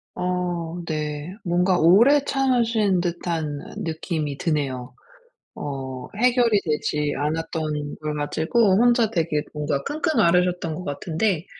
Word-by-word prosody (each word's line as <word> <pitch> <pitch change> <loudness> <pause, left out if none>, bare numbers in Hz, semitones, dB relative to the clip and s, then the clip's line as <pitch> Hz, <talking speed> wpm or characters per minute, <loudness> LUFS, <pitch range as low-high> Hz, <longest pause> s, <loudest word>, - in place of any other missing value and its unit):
어 175 -2 -2
네. 150 +1 -4
뭔가 180 +1 +2
오래 235 - +6
참으신 230 -9 +2
듯한 165 -4 -2 0.2
느낌이 160 -3 -3
드네요. 135 -6 -2 0.6
어 130 -3 -6
해결이 240 -2 +3
되지 150 -1 -1
않았던 155 -1 -2
걸 150 -1 -3
가지고 160 +9 +1
혼자 235 -1 +4
되게 160 -6 0
뭔가 145 -2 -2
끙끙 310 - 0
앓으셨던 180 -2 +2
것 180 - -6
같은데 165 +5 -1
170 Hz, 240 characters per minute, -23 LUFS, 150-200 Hz, 0.6 s, 오래